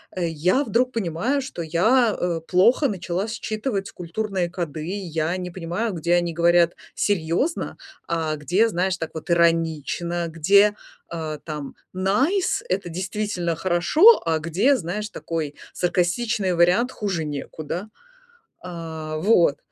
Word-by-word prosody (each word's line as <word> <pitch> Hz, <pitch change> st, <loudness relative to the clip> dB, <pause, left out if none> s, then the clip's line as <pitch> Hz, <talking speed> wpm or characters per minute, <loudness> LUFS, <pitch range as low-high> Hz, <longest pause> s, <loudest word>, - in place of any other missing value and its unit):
я 180 Hz, -, +1 dB
вдруг 250 Hz, 0 st, +1 dB
понимаю, 225 Hz, -, -1 dB
что, 260 Hz, -10 st, -6 dB
я, 215 Hz, +9 st, +3 dB
э, 170 Hz, -2 st, -1 dB
плохо 235 Hz, +10 st, +4 dB
начала 185 Hz, 0 st, -3 dB
считывать 215 Hz, -2 st, -3 dB
культурные 180 Hz, 0 st, -3 dB
коды. 160 Hz, -3 st, -4 dB
Я 170 Hz, -4 st, -2 dB
не 180 Hz, -1 st, -5 dB
понимаю, 185 Hz, +5 st, -3 dB
где 170 Hz, +1 st, 0 dB
они 175 Hz, -1 st, 0 dB
говорят 170 Hz, 0 st, +3 dB, 0.2 s
серьезно, 200 Hz, -, 0 dB, 0.3 s
а 160 Hz, -2 st, -1 dB
где 180 Hz, +10 st, +2 dB
знаешь 185 Hz, -1 st, 0 dB
так 160 Hz, -, -5 dB
вот 160 Hz, +2 st, -8 dB
иронично. 170 Hz, 0 st, +1 dB
Где, 200 Hz, +6 st, +4 dB, 0.4 s
э, 155 Hz, -2 st, -4 dB
там 150 Hz, -3 st, -6 dB, 0.2 s
nice- 265 Hz, -, +1 dB
это 185 Hz, -1 st, -1 dB
действительно 185 Hz, -1 st, -2 dB
"хорошо", 185 Hz, -, +5 dB
а 160 Hz, -1 st, +1 dB
где, 190 Hz, -, +2 dB
знаешь, 210 Hz, +4 st, -4 dB
такой 155 Hz, -3 st, -4 dB, 0.2 s
саркастичный 185 Hz, +3 st, 0 dB
вариант 180 Hz, +9 st, +3 dB
"хуже 185 Hz, -7 st, -2 dB
некуда". 155 Hz, +6 st, -5 dB, 0.8 s
Э, 160 Hz, -3 st, -6 dB
вот, 170 Hz, -4 st, +3 dB
175 Hz, 125 wpm, -23 LUFS, 165-210 Hz, 0.8 s, хорошо